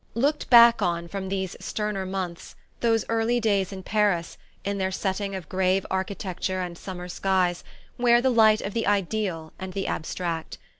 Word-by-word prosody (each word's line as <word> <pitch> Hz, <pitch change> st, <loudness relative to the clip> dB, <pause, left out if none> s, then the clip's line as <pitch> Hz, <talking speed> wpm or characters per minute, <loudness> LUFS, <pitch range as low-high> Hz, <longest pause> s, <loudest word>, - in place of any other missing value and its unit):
Looked 285 Hz, +6 st, 0 dB
back 235 Hz, -1 st, +8 dB
on 170 Hz, -1 st, 0 dB
from 190 Hz, +1 st, -5 dB
these 190 Hz, -1 st, -2 dB
sterner 210 Hz, -3 st, -3 dB
months 185 Hz, -3 st, -5 dB, 0.2 s
those 225 Hz, -2 st, +2 dB
early 230 Hz, +1 st, +1 dB
days 200 Hz, -4 st, +1 dB
in 190 Hz, -1 st, -7 dB
Paris, 200 Hz, -4 st, +1 dB, 0.3 s
in 200 Hz, 0 st, -2 dB
their 190 Hz, 0 st, 0 dB
setting 195 Hz, +1 st, -2 dB
of 185 Hz, -5 st, -7 dB
grave 190 Hz, 0 st, +1 dB
architecture 190 Hz, -1 st, -2 dB
and 180 Hz, -1 st, -4 dB
summer 180 Hz, 0 st, -7 dB
skies, 180 Hz, -1 st, 0 dB, 0.4 s
wear 240 Hz, -1 st, +5 dB
the 260 Hz, +1 st, +2 dB
light 220 Hz, -2 st, +5 dB
of 200 Hz, -, -4 dB
the 230 Hz, -, -1 dB
ideal 195 Hz, -5 st, -1 dB
and 190 Hz, -1 st, -6 dB
the 195 Hz, 0 st, -2 dB
abstract. 165 Hz, 0 st, -3 dB
195 Hz, 165 wpm, -25 LUFS, 185-215 Hz, 0.4 s, back